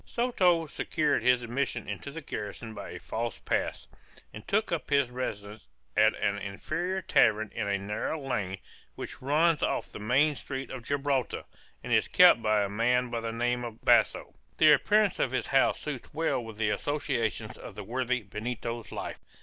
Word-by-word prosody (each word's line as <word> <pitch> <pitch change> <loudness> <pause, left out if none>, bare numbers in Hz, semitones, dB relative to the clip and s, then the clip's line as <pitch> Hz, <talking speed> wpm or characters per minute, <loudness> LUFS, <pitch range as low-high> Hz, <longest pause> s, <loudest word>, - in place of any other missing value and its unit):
Soto 185 -9 +2
secured 150 0 0
his 125 -1 +3
admission 120 -1 -2
into 105 +7 -5
the 160 +3 -7
garrison 110 -3 -6
by 100 -2 -7
a 90 - -7
false 115 +3 -4
pass, - - -2 0.5
and 110 - -10
took 215 +2 +1
up 170 -2 -2
his 140 -3 +2
residence 105 - -5 0.3
at - - +5
an 100 0 -1
inferior 175 - -3
tavern 110 -7 +3
in 110 -3 -2
a 100 0 +1
narrow 105 +10 -3
lane, 100 -9 -2 0.4
which - - -8
runs 155 +4 +3
off - - -1
the - - -8
main 130 +8 +3
street 135 -1 -6
of 130 - -6
Gibraltar, 140 -1 -1 0.4
and - - -2
is - - +3
kept 115 - +7
by 110 -2 +2
a - - 0
man 120 +4 +1
of 115 - -1
the 115 0 -3
name 120 +1 -1
of 115 -2 -7
Basso. - - +3 0.2
The 155 -1 +7
appearance 210 +6 +3
of - - +2
this 130 - -1
house 135 -1 +3
suits 145 -5 -6
well 160 -6 0
with 110 -2 -9
the 105 -1 +1
associations 140 -4 -2
of - - -10
the 105 - -6
worthy 125 +2 -1
Benito's 115 +3 -5
life. - - -5
125 Hz, 180 wpm, -29 LUFS, 110-145 Hz, 0.5 s, kept